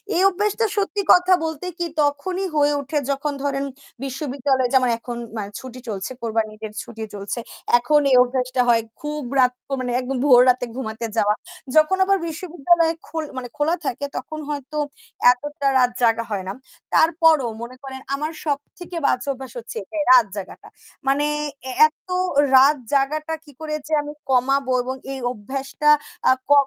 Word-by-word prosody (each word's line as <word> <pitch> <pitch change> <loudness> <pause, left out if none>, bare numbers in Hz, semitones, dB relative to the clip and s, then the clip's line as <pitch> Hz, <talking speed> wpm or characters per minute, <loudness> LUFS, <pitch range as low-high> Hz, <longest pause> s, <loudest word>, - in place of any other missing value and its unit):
এই 360 - +3
অভ্যাসটা 415 +4 0
সত্যি 405 0 0
কথা 360 +1 +5
বলতে 320 +2 -4
কি 345 - -1 0.2
তখনই 360 +7 0
হয়ে 290 0 +3
ওঠে 280 +2 -3
যখন 285 +1 -2
ধরেন 275 -1 -1 0.4
বিশ্ববিদ্যালয়ে 270 -1 -1
যেমন 255 -2 +4
এখন 240 0 -6 0.2
ম্যা 215 - -2 0.2
ছুটি 255 -1 -9
চলছে 195 +3 -4
কোরবানিত 225 -1 -1
ইদের 215 -1 -7
ছুটি 225 -1 -8
চলছে। 200 +4 -4 0.4
এখন 295 +5 +3
এই - - +6
অভ্যাসটা 255 0 -1
হয় 230 -1 +5 0.2
খুব 300 0 -4 0.2
রাত 250 0 +5 0.2
তো - - -15
মানে 250 -1 -2
একদম 260 +1 -3
ভোর 250 -3 +8
রাতে 250 0 +2
ঘুমাতে 230 -3 -4
যাওয়া। 210 -1 +3 0.4
যখন 310 +5 +5
আবার 395 0 +3
বিশ্ববিদ্যালয় 330 0 +1 0.2
খোল 320 -1 -3
মানে 245 -2 -5
খোলা 310 +4 +2
থাকে 275 +2 -2
তখন 310 0 -6
হয়তো 290 +1 -5 0.5
এতটা 285 +2 -3
রাত 250 -1 +4
জাগা 230 0 +3
হয় 195 -2 -2
না, 195 - -3 0.4
তারপরও 320 -6 +4
মনে 245 +2 -7
করেন 265 -1 -7
আমার 305 +3 -3
সবথেকে 310 +4 -4
বাজে 255 +2 +1
অভ্যাস 260 -2 -9
হচ্ছে 230 - -9
এটাই 305 +8 -3
রাত 245 -3 +8
জাগাটা। 195 -2 -8 0.4
মানে 285 +2 +3 0.4
এ্যা 260 - -5
এত 375 - -23 0.5
রাত 280 +3 +7 0.2
জাগাটা 305 +3 +1
কি 290 - -15
করে 310 -1 -3
যে 315 - -4
আমি 295 0 -7 0.2
কমাবো 265 +1 +2
এবং 260 +1 -3 0.2
এই 265 - -5
অভ্যাসটা 270 +6 -2 0.4
আ - - +7 0.2
ক - - -1
275 Hz, 165 wpm, -22 LUFS, 250-305 Hz, 0.5 s, ভোর